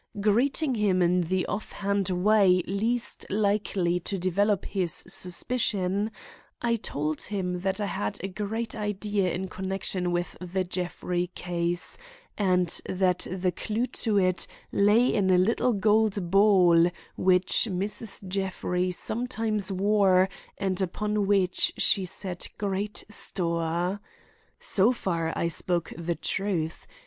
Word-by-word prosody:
Greeting 255 +8 +2
him 205 -5 +2
in 180 +1 +3
the 185 +2 0
offhand 200 -2 -2
way 185 -1 +4
least 225 +5 -1
likely 200 -4 +1
to 195 +3 -4
develop 190 +2 +1
his 185 -4 -1 0.2
suspicion, 195 +1 +1 0.5
I 235 -1 +1
told 150 -6 -3
him 180 -3 -3
that 190 +2 -1
I 205 - 0
had 105 - -3
a - - -1
great 215 +4 -4
idea 205 -3 -1
in 190 +3 -3
connection 185 -1 -2
with 175 0 -2
the 185 +1 -2
Jeffrey 180 0 -2
case 175 - -2 0.4
and 180 -4 +2 0.2
that 185 -1 +1
the 185 0 0
clue 220 +6 -2
to 220 -4 0
it 185 -2 +2 0.2
lay 210 +4 +4
in 195 -3 +2
a 185 - +5
little 230 +6 +2
gold 210 -3 +2
ball 185 -4 +5 0.3
which 185 +5 +3
Mrs. 200 +1 -2
Jeffrey 185 -1 -1
sometimes 215 0 -1
wore 195 -1 +3 0.3
and 190 -1 -1
upon 210 +2 -1
which 190 -3 +3
she 195 - +3
set 180 0 -5
great 205 +1 -2
store. 170 -1 -1 0.6
So 200 +5 +3
far 170 -8 -2
I 170 - 0
spoke 170 0 -1
the 170 +1 -2
truth. 175 -6 -2
190 Hz, 125 wpm, -27 LUFS, 180-210 Hz, 0.6 s, a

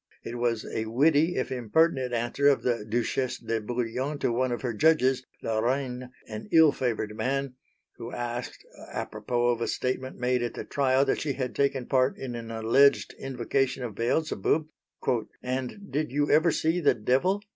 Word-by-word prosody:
It 120 +1 -6
was 120 -2 0
a 110 - -3
witty 150 +8 +3
if 130 - -2
impertinent 130 +2 +1
answer 120 +4 +1
of 140 - +4
the 120 -4 0
Duchesse 120 +4 -1
de 115 -1 -2
Bouillon 125 +5 -2
to 130 - 0
one 125 +2 0
of 120 - -3
her 120 -2 -1
judges, 130 -1 +3 0.2
La 110 -1 0
Reyne, 125 +1 -1 0.2
an 110 0 -7
ill 160 -2 +7
favoured 110 -5 -2
man, 135 +2 -1 0.4
who 120 +1 -7
asked, 120 0 -5 0.3
apropos 120 +3 -1
of 120 -1 0
a - - 0
statement 130 +1 -2
made 125 0 +1
at 120 -1 -3
the - - -5
trial 135 -1 +2
that 135 - 0
she 145 -2 -1
had 130 -1 -3
taken 135 -2 0
part 130 0 +2
in 130 -2 -5
an 115 -1 -6
alleged 115 +5 +3
invocation 135 0 -1
of 115 -3 -4
Beelzebub, 155 +7 0 0.8
"and 130 +11 -4
did 150 -1 -1
you 145 +2 +1
ever 160 +3 +5
see 160 +3 +1
the 150 - +3
Devil?" 135 - +1
125 Hz, 175 wpm, -27 LUFS, 120-140 Hz, 0.8 s, ill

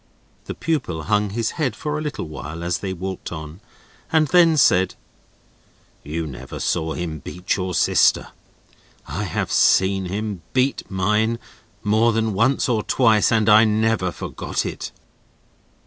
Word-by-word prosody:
The - - -6
pupil 90 - -2
hung 105 +2 +1
his 115 +2 -2
head 130 -7 0
for 150 +3 -3
a 150 - -2
little 150 - -4
while, 75 +2 -7
as 85 0 -1
they 95 - -4
walked 95 +1 -5
on, 80 +2 -8 0.5
and 160 -1 +3
then 170 -3 +5
said: 95 -8 +4 1.1
"You 80 +3 -4
never 65 -3 -8
saw 80 -2 -1
him 80 -3 -4
beat 90 +6 -3
your 90 -2 -3
sister. - - +3 0.8
I - - -3
have - - -3
seen 95 0 +3
him 100 0 -4
beat 130 +1 0
mine, 105 +5 +1 0.5
more 110 +3 +3
than 110 -1 0
once 130 +7 +2
or 115 -4 +1
twice, 110 -3 +3
and 110 -2 +2
I 110 0 +7
never 110 -3 +1
forgot - - -4
it." - - -5
105 Hz, 150 wpm, -22 LUFS, 90-115 Hz, 1.1 s, I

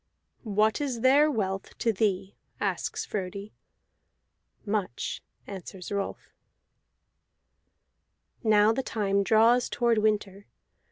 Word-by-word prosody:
"What 215 +4 +2
is 255 -5 -2
their 280 +4 +5
wealth 195 -7 -3
to 230 - +1
thee?" 195 -1 -1 0.2
asks - - -2
Frodi. 200 +1 -5 1.1
"Much," 205 - -2 0.2
answers 190 -1 -8
Rolf. 200 -1 -4 2.1
Now 215 -1 +5
the 265 - -1
time 200 -5 0
draws 230 +4 +4
toward 235 -2 +2
winter. 205 -2 -1
210 Hz, 95 wpm, -27 LUFS, 195-225 Hz, 2.1 s, their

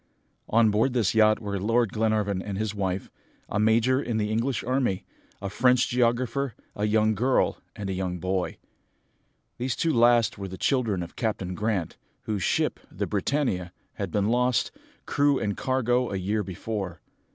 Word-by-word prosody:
On 110 -1 +4
board 110 +5 +2
this 115 -6 +2
yacht 110 -1 +5
were 100 -2 -3
Lord 115 +2 +1
Glenarvan 105 -3 +1
and 100 0 -5
his 110 0 -2
wife, 95 -2 -2 0.4
a - - -2
major 115 +5 +3
in 120 -5 -2
the 105 -1 0
English 115 +4 0
army, 125 -6 0 0.3
a 100 - -4
French 125 +5 +3
geographer, 125 +1 +1 0.2
a 105 - -1
young 110 0 +3
girl, 125 +5 +1 0.2
and 100 - -5
a 95 - -2
young 90 -1 -2
boy. 95 +1 -2 1.0
These 125 0 -1
two 165 -1 +1
last 120 -2 +4
were 100 - -4
the 95 0 -8
children 115 -9 +1
of 85 - -10
Captain 100 -6 -2
Grant, 100 -3 -2 0.3
whose 105 -3 -2
ship, - - +1
the - - -2
Britannia, 95 -12 -1 0.2
had - - -4
been 100 0 +1
lost, 125 0 +2 0.3
crew 145 -1 +2
and 100 -4 -1
cargo, 125 -2 +1
a 100 - -2
year 100 +4 0
before. 95 -2 -5
110 Hz, 165 wpm, -26 LUFS, 100-120 Hz, 1.0 s, yacht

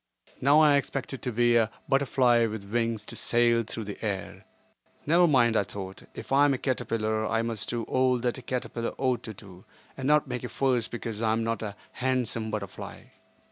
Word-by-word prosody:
Now 145 +4 +6
I 150 -2 +6
expected 135 -1 -3
to 125 - -2
be 120 +1 +3
a 115 -2 +3 0.2
butterfly 130 -4 +3
with 105 -2 -6
wings 115 0 -1
to - - -6
sail 120 0 +3
through 110 +1 -6
the 100 +1 -8
air. 100 -3 -4 0.6
Never 170 +3 +5
mind, 120 -6 +4
I - - +4
thought, 95 -1 -8
if - - -9
I 140 +1 +5
am 140 -2 +3
a - - -3
caterpillar 110 -4 -1
I 115 0 0
must 115 -3 -3
do 120 -1 -2
all 130 +1 +2
that 120 +1 -2
a - - -10
caterpillar 120 -1 -3
ought 130 -2 0
to 110 - -8
do, 95 -2 -13 0.3
and 135 0 -4
not 150 0 +4
make 125 -1 -4
a 125 - -4
fuss 125 -4 +1
because 115 -2 -6
I 110 -1 +2
am 115 +1 0
not 115 0 -2
a 105 -2 -5 0.2
handsome 125 -4 -1
butterfly. 105 -3 -7
120 Hz, 200 wpm, -27 LUFS, 110-130 Hz, 0.6 s, Now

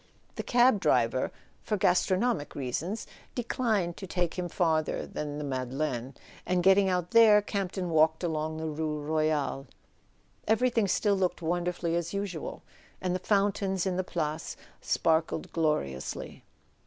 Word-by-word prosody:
The - - -4
cab 245 -3 +4
driver, 125 -4 +2 0.3
for 210 - -1
gastronomic 185 - +1
reasons, 150 - -3 0.3
declined 225 -8 0
to 190 - -7
take 175 -2 -1
him 180 -1 -3
farther 160 -3 0
than 150 -1 -5
the 150 - -4
Madeleine; 130 -1 -3 0.3
and 180 -1 0
getting 195 +1 +5
out 180 -1 -1
there, 225 -3 +7
Campton 195 -3 -3
walked 160 +1 +3
along 155 -1 -2
the 160 - -4
rue 155 0 -2
Royale. 150 -2 -1 0.8
Everything 225 -1 +2
still 205 +2 +2
looked 185 -2 -1
wonderfully 175 0 -1
as 170 +2 -2
usual; 195 -6 -4 0.4
and 185 -1 -1
the 185 - -1
fountains 195 -1 +1
in 185 -2 0
the 185 - 0
Place 155 -4 -3 0.2
sparkled 160 0 0
gloriously. 150 - -2
175 Hz, 135 wpm, -29 LUFS, 155-195 Hz, 0.8 s, there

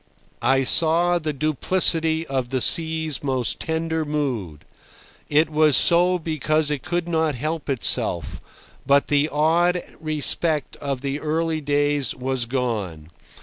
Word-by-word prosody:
I 135 +3 +2
saw 170 +5 +3
the 155 -2 -3
duplicity 160 +2 +1
of 130 -4 -3
the 130 0 -1
sea's 160 +2 +1
most 130 -4 0
tender 160 0 -2
mood. 130 - -4 0.6
It 150 +2 +3
was 155 -2 +3
so 180 +1 +4
because 155 -2 -1
it 145 -3 -2
could 175 0 -3
not 160 -3 0
help 155 +4 -4
itself, 90 - -1 0.4
but 140 0 +2
the 145 +1 +2
awed 170 +4 +1 0.2
respect 155 -1 0
of 140 -3 -4
the 140 +1 -3
early 160 +1 -2
days 145 -2 0
was 130 -1 -2
gone. 105 - -4
150 Hz, 130 wpm, -22 LUFS, 135-160 Hz, 0.6 s, so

